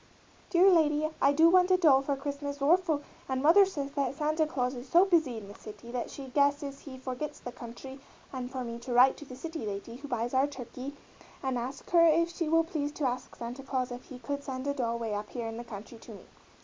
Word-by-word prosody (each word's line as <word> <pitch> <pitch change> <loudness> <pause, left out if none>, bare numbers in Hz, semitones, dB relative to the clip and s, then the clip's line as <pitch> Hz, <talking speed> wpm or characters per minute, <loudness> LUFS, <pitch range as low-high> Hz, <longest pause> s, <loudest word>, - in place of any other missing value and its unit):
_ - - -30
dere 360 +2 +5
lady 310 -3 +3
I 280 - +5
doo 320 +3 +5
want 365 0 +5
a 370 - +5
dol 295 -7 +5
for 275 +1 -1
Christmas 285 +1 -5
orful 315 0 +2 0.3
and 260 0 0
mother 340 +8 +6
says 285 -7 -4
that 275 -2 -1
Sante 310 +1 +1
Claws 250 -4 -1
is 250 0 -8
so 350 +7 +6
busy 320 -11 +2
in 210 -2 -8
the 200 - -10
city 215 +3 -11
that 245 -1 -3
she 270 -2 -8
gueses 285 0 +1
he 265 -3 -10
forgits 260 +3 -5
the 245 - -7
cuntry 245 +3 -9 0.3
and 250 -1 -4
for 260 -1 -4
me 235 -1 -6
to 245 +1 -5
rite 255 +2 +6
to 295 - -10
the 255 - -10
city 320 +3 -6
lady 210 +3 -5
who 285 +2 -9
buys 245 -2 -2
our 265 +2 +3
turkey 275 0 -8 0.5
and 265 -1 0
ask 260 +4 -6
her 340 -1 +6
if 335 +1 +4
she 335 -2 -2
will 330 +1 +4
pleas 310 -4 -3
to 300 - -2
ask 250 0 -4
Sante 240 +3 -6
Claws 260 -2 -2
if 245 +1 -7
he 260 - -10
could 280 +4 -4
send 260 -1 -5
a 285 - 0
dol 235 -4 -1
way 225 -2 -3
up 205 +1 -4
here 240 -2 -5
in 225 0 -5
the 240 - -5
cuntry 225 0 -10
to 225 - -11
me. - - -13
275 Hz, 245 wpm, -30 LUFS, 245-300 Hz, 0.5 s, mother